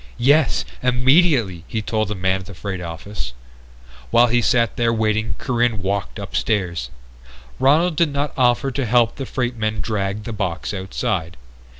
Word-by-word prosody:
"Yes! 145 +4 +3 0.2
Immediately!" 125 - +3
he 110 - -2
told 110 -1 -1
the 105 - -3
man 95 0 0
at 95 - -11
the 100 - -10
freight 95 0 -5
office. 85 -4 -6 0.8
While 120 - +6
he 120 +1 +3
sat 115 0 +2
there 115 -1 +2
waiting 110 0 0
Corinne 120 -5 0
walked 100 +2 -2
upstairs. 95 - -2 0.7
Ronald 155 +5 +3
did 165 -3 +3
not 140 +1 -2
offer 125 +1 +2
to 135 0 -2
help 120 -1 +3
the 135 -3 -5
freight 125 -1 -2
men 110 -1 -1
drag 100 0 -2
the 115 - -5
box 95 -2 -3
outside. 95 - -3
110 Hz, 160 wpm, -21 LUFS, 95-125 Hz, 0.8 s, While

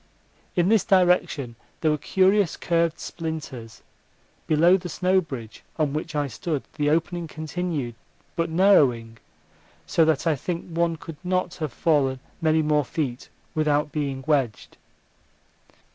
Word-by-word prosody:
In 175 0 +3
this 220 -2 +4
direction 180 - +2 0.3
there 155 - +3
were 150 - +1
curious 190 +3 +2
curved 170 -1 +1
splinters; 145 -9 -6 0.6
below 170 +4 +5
the 180 -2 -4
snow 185 +2 +2
bridge 120 -9 -8 0.2
on 150 -3 0
which 155 +1 -4
I 145 -1 +1
stood 140 +4 -3
the 145 0 0
opening 165 +2 0
continued, 155 -5 -3 0.4
but 165 0 0
narrowing, 135 - +3 0.7
so 165 - +3
that 155 -1 +1
I 160 -2 +3
think 170 +5 -4
one 170 0 +1
could 160 0 -10
not 185 -1 0
have 155 -5 -3
fallen 135 0 +1 0.2
many 160 0 +3
more 150 -1 +2
feet 130 -3 -4 0.2
without 150 -1 +1
being 140 -3 -3
wedged. 135 -8 0
155 Hz, 135 wpm, -24 LUFS, 140-170 Hz, 0.7 s, below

